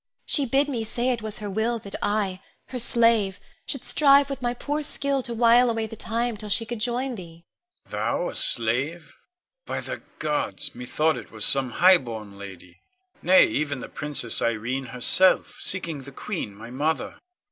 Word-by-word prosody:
She 280 -3 +1
bid 275 +4 +2
me 245 -6 -2
say 240 +3 -2
it 240 -2 -2
was 215 -1 -6
her 210 - -6
will 220 +4 0
that 200 -3 -10
I, 205 -3 -1 0.3
her 255 - -5
slave, 230 -5 +2 0.3
should 275 - -4
strive 280 -1 +4
with 275 - -5
my 240 0 -1
poor 295 +4 -3
skill 280 -2 -1
to 240 - -7
while 240 +1 +5
away 225 -1 -1
the 220 - -8
time 230 +1 -2
till 210 +1 -7
she 225 +3 0
could 240 -1 -5
join 245 +3 -1
thee. 170 -5 -11 0.4
Con. - - -25
Thou, - - -1
a - - -7
slave? 135 +8 +2 0.5
By - - -2
the - - -6 0.2
gods! 270 - -2
methought 150 +6 0
it - - -9
was 110 -2 -2
some 135 -3 +2
highborn 120 - +3
lady, 95 -3 -12 0.4
nay, 185 +1 +6
even 145 -3 -2
the - - -8
Princess 145 -6 +1
Irene 120 +4 -1
herself, 125 +10 +3
seeking 170 -5 -2
the 135 +1 -11
queen, 135 - -5
my 115 +3 -10
mother. 150 +5 -2
200 Hz, 180 wpm, -25 LUFS, -, 0.5 s, nay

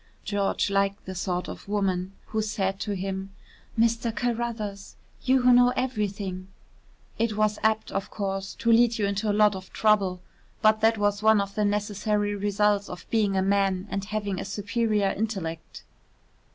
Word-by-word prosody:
George 200 -1 0
liked 200 0 0
the 190 - -5
sort 180 0 -2
of - - -9
woman 195 -2 -1 0.2
who 220 - 0
said 195 -3 -2
to 205 -2 -2
him: 195 +1 -4 0.4
"Mr. 230 0 +2
Carruthers, 225 -3 -3 0.3
you 260 -1 +3
who 250 0 +6
know 245 0 +6
everything 200 -6 -2 0.4
" - - -33
It 220 -2 0
was 215 0 +1
apt, 220 0 +1
of 195 - -3
course, 195 -1 -4
to 230 - +1
lead 235 0 +5
you 210 - +1
into 200 +2 -1
a 205 +1 +1
lot 210 -1 +5
of 190 0 -9
trouble, 200 -4 +2 0.4
but 215 0 +4
that 225 0 +4
was 205 0 +1
one 220 -1 +5
of 200 0 -2
the 210 0 0
necessary 205 0 0
results 205 0 +1
of 180 - -8
being 205 -4 +2
a 190 - +2
man 195 -1 +1
and 195 - -2
having 205 -2 -3
a - - -3
superior 210 0 0
intellect. 190 -7 -4
205 Hz, 170 wpm, -26 LUFS, 195-220 Hz, 0.4 s, who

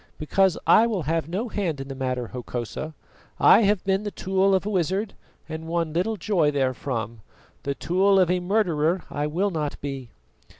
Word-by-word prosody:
"Because 190 +4 +2
I 230 - +6
will 205 -7 -2
have 165 +1 -1
no 200 +8 -2
hand 185 -10 -2
in 135 - -6
the 135 - -5
matter, 130 -3 -3
Hokosa. 125 +5 -5 0.4
I - - +7
have 205 -2 +2
been 195 0 +1
the 210 - -3
tool 195 0 +1
of 190 - 0
a - - -1
wizard, 190 +3 0 0.3
and 160 0 -6
won 165 -2 -1
little 190 +6 0
joy 170 -5 +2
therefrom. 130 -5 -2 0.4
The 140 0 -3
tool 195 +5 +3
of 180 -2 +3
a 180 - +1
murderer 180 -3 +1
I 145 +1 -1
will 185 +7 0
not 150 -4 -3
be!" 135 -4 -6
170 Hz, 180 wpm, -25 LUFS, 145-195 Hz, 0.4 s, I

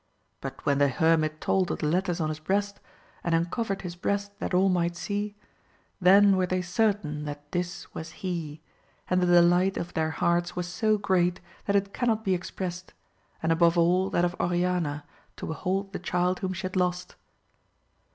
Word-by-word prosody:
But - - -7
when 140 -1 +2
the 145 - +5
hermit 155 +2 +2
told 185 -2 +1
of - - -1
the - - -3
letters 175 +2 0
on 155 -2 0
his 155 0 -4
breast, 200 +5 -1 0.4
and 170 -1 +1
uncovered 195 +4 -1
his 175 -2 -5
breast 200 +3 -2
that - - -3
all 185 +1 +4
might 175 -2 +1
see, 205 +3 -3 0.7
then 195 +2 +6
were 185 -1 +1
they 185 0 -1
certain 180 -6 0
that 145 0 -8
this 175 +1 -4
was 160 - -6 0.2
he, 160 -4 -4 0.5
and 180 0 +3
the 180 - +2
delight 175 +2 +4
of 170 - -4
their 160 0 0
hearts 170 +2 0
was 180 0 -2
so 215 +5 +1
great 180 -3 +1 0.3
that 200 - +1
it 200 0 +1
cannot 225 -3 0
be 190 - +2
expressed, 180 0 -5 0.5
and 160 - +2
above 170 +1 +4
all 180 +3 +3
that 175 - +2
of 175 0 -2
Oriana 175 -4 0 0.3
to - - -7
behold 190 +5 -2
the - - -3
child 180 +1 0
whom 190 - -2
she 190 +2 -6
had 185 0 -4
lost. 180 0 -1
180 Hz, 180 wpm, -27 LUFS, 170-190 Hz, 0.7 s, then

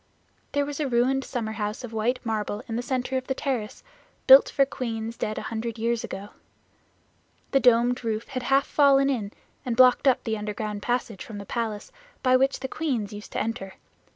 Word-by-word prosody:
There 285 0 +1
was 290 0 -5
a 300 - 0
ruined 260 +2 +2
summer 230 -5 -3
house 210 +2 -4
of 235 -2 -7
white 235 +3 0
marble 215 0 -2
in 225 - -4
the 240 - -1
center 260 0 -2
of 260 - -5
the 265 - -1
terrace, 245 -7 -3 0.4
built 265 +1 +9
for 275 - +3
queens 230 -4 -4
dead 215 - -3
a - - -4
hundred 230 0 -3
years 230 +1 0
ago. 200 +2 -6 1.2
The 270 - +4
domed 245 0 +3
roof 225 0 -3
had 260 -3 -3
half 270 +2 +2
fallen 275 -1 +4
in 210 -6 -3 0.3
and 245 -4 -3
blocked 255 +2 +6
up 260 - +3
the 220 -2 -2
underground 210 0 -4
passage 240 -4 -2
from 220 -3 -9
the 200 - -7
palace 220 -1 -4 0.3
by 255 -1 +5
which 270 +1 +2
the 265 - -2
queens 250 -9 -2
used 205 0 -9
to - - -1
enter. 195 -4 -4
235 Hz, 195 wpm, -26 LUFS, 220-265 Hz, 1.2 s, built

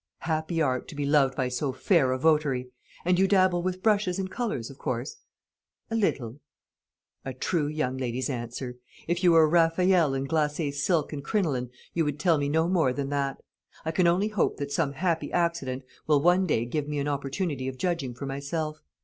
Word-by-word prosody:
"Happy 160 +1 -1
art, 130 -5 0
to - - -9
be 145 0 -2
loved 140 -2 +3
by 130 -2 0
so 125 +3 -1
fair 135 0 +2
a 130 - 0
votary! 135 -4 +1 0.3
And 180 0 +3
you 195 - +4
dabble 185 -3 +3
with 185 +1 -3
brushes 205 -4 +2
and 190 -1 -3
colours, 210 - -3
of 135 - -15
course?" 125 +3 -3 0.7
"A - - 0
little." 135 - -1 0.8
"A 135 -2 -5
true 150 +3 0
young 150 -4 -2
lady's 130 0 -2
answer. 125 0 -5 0.3
If 175 +2 -1
you 175 -2 +6
were 165 -1 +7
a - - +5
Raffaelle 165 -1 +3
in 135 0 -2
glacé 150 0 0
silk 150 +2 0
and 140 -2 -5
crinoline, 145 - 0 0.2
you 165 - +1
would 150 -1 -2
tell 170 -4 +3
me 140 0 0
no 160 +2 +2
more 165 -8 +2
than 140 0 -3
that. 140 -1 -2 0.4
I 160 - 0
can 170 +2 +3
only 185 +5 +2
hope 210 -4 0
that 140 0 -4
some 145 -1 0
happy 165 +2 -1
accident 165 -7 -1 0.2
will 150 -2 +4
one 180 +2 +4
day 115 -7 +1
give 145 +4 -2
me 150 0 -3
an 140 0 -1
opportunity 140 0 -2
of 130 -1 -5
judging 160 -7 -2
for 140 - -6
myself. 155 +3 -3
150 Hz, 200 wpm, -27 LUFS, 135-175 Hz, 0.8 s, were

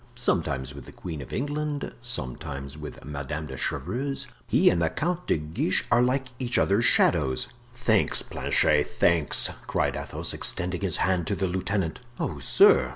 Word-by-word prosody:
"Sometimes 75 - -1
with 70 -3 -10
the - - -11
queen 80 -5 -7
of - - -10
England, 145 +1 -3
sometimes 70 - -4
with 75 -3 -9
Madame 75 +1 -5
de 65 -3 -7
Chevreuse. 120 - -2 0.2
He - - +3
and 85 - 0
the 80 - +2
Count 175 - -2
de - - +2
Guiche 80 +4 0
are 120 - +5
like 130 +1 +1
each 125 -2 -1
other's 105 +5 +3
shadows." 70 -7 +3 0.3
"Thanks, 115 -4 +2
Planchet, 75 -1 +2
thanks!" 85 -4 +4 0.2
cried - - 0
Athos, - - -3
extending 90 +1 -3
his 95 -4 0
hand 90 -3 0
to 100 - 0
the 95 - -1
lieutenant. 95 -1 -2 0.2
"Oh, 75 - -3
sir!" 65 0 +5
90 Hz, 160 wpm, -26 LUFS, 75-120 Hz, 0.3 s, are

